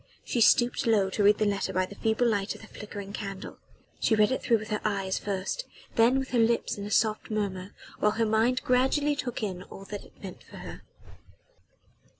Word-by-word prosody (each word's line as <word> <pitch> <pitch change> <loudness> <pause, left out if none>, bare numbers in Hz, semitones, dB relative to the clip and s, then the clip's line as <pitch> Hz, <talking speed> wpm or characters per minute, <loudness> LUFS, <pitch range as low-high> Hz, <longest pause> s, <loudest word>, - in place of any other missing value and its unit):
She 240 - 0
stooped 240 +1 +4
low 200 -4 +3
to 210 - -1
read 205 +1 +6
the 215 - +1
letter 200 -1 0
by 185 0 +1
the 195 - -11
feeble 220 +3 +1
light 205 -3 0
of - - -13
the 220 - -12
flickering 205 -2 -8
candle. 195 -2 -6 0.4
She 220 - +3
read 210 +1 +4
it 260 - -1
through 235 - +3
with 215 0 -8
her 210 -1 -1
eyes 195 -3 -1
first 200 - -3 0.3
then 235 +3 +5
with 265 -1 -2
her 245 - +1
lips 230 +1 +2
in 200 0 -6
a - - -6
soft 215 0 +1
murmur, 200 -3 -3 0.2
while 210 - +3
her 225 +1 +1
mind 225 +4 +2
gradually 265 +4 +2
took 245 -5 -4
in 185 -3 -3
all 195 +1 -11
that 205 - -5
it - - -20
meant - - -8
for - - -13
her. - - -9
215 Hz, 210 wpm, -28 LUFS, 200-235 Hz, 0.4 s, read